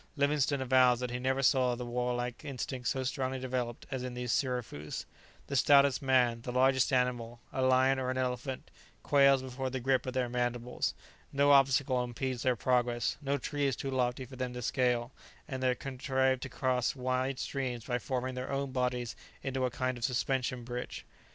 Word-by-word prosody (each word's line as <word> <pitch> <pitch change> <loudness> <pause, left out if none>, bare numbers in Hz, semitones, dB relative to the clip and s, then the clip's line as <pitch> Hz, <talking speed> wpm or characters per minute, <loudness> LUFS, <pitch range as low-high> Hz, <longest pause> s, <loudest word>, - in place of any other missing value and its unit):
Livingstone 140 -1 +2
avows 130 -1 +4
that 125 -1 -3
he 125 - -3
never 130 +2 0
saw 125 -2 +3
the 125 0 -5
warlike 125 +1 -2
instinct 130 -3 -4
so 130 - 0
strongly 130 0 -2
developed 125 -2 -3
as 130 -1 -2
in 125 -1 -5
these 125 -1 -2
sirafoos; 125 - -2 0.4
the 140 - -4
stoutest 140 0 +5
man, 125 -3 +3
the 125 - -5
largest 130 +1 +3
animal, 120 -2 0
a 130 - -1
lion 130 +1 +4
or 130 -1 -2
an 130 - -1
elephant, 130 +1 -3 0.3
quails 140 -2 +5
before 130 0 -4
the 130 0 -3
grip 130 +1 +1
of 130 - -4
their 130 -1 +1
mandibles: 120 0 -1 0.4
no 140 +1 +4
obstacle 135 -2 +4
impedes 125 0 -3
their 130 -1 +2
progress; 120 -1 +1
no 140 0 0
tree 145 +1 -1
is 135 - 0
too 135 - -4
lofty 125 0 0
for 130 +1 -12
them 125 -1 -3
to 125 0 -5
scale, 125 -1 +1 0.4
and 130 -1 -4
they 130 -1 +2
contrive 130 0 0
to 130 - -6
cross 130 -1 0
wide 130 +1 -1
streams 125 -5 -3
by 125 -1 -1
forming 130 +1 -2
their 125 +1 -5
own 140 0 -2
bodies 125 -2 -1 0.3
into 130 -1 -1
a - - +1
kind 130 0 -2
of - - -8
suspension 125 0 0
bridge. 125 +1 -6
130 Hz, 185 wpm, -31 LUFS, 125-130 Hz, 0.4 s, stoutest